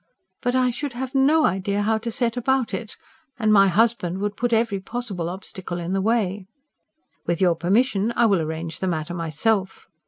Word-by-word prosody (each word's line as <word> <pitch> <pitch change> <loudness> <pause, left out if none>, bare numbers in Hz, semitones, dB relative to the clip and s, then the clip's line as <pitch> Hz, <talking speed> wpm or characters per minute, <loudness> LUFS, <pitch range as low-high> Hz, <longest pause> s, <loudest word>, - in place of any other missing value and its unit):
"But 245 0 0
I 255 -1 +3
should 275 +2 -4
have 255 +1 -5
no 290 +4 +4
idea 200 +2 0
how 220 +1 +1
to 230 +1 -4
set 230 0 -1
about 255 0 0
it. 225 -3 -5 0.4
And 215 -1 +2
my 195 -1 +6
husband 195 -2 +2
would 205 +1 -2
put 245 +3 -1
every 225 -3 +1
possible 195 -5 -4
obstacle 185 -1 -7
in 175 +1 -3
the 195 - +1
way." 205 -3 0 0.8
"With 170 -1 0
your 180 -2 +4
permission 200 +5 +1
I 235 - +4
will 195 -6 +3
arrange 160 +1 -4
the 190 - -2
matter 160 -1 -2
myself." 185 +5 -1
205 Hz, 185 wpm, -23 LUFS, 185-235 Hz, 0.8 s, my